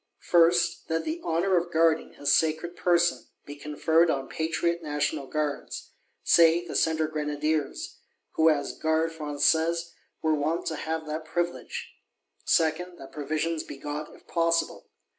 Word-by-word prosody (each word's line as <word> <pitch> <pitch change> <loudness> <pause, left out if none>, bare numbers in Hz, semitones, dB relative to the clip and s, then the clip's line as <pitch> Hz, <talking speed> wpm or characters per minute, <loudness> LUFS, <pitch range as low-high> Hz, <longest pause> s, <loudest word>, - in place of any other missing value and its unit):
First, 170 0 +4
that 165 0 -1
the 320 +2 -3
honour 175 +3 +1
of 170 0 -1
Guarding 165 -1 +2
his 145 0 +1
sacred 160 +2 +1
person 175 -1 +2 0.2
be 145 - -8
conferred 160 +3 +2
on 135 -3 -1
patriot 170 +2 -1
National 145 -3 -2
Guards;—say, 160 +3 +1
the - - -7
Centre 160 -1 +2
Grenadiers, 150 -1 -2 0.3
who 160 0 +4
as 145 -2 0
Gardes 160 +1 +1
Françaises 160 +3 +1 0.3
were 160 0 +3
wont 155 +3 -1
to 160 - -2
have 160 +1 -3
that 155 +1 -4
privilege. 175 +2 -3 0.5
Second, 175 +2 +1
that 135 - -11
provisions 155 +2 -2
be - - -9
got, 150 +2 -5
if - - -20
possible. 165 0 0
160 Hz, 140 wpm, -27 LUFS, 150-170 Hz, 0.5 s, First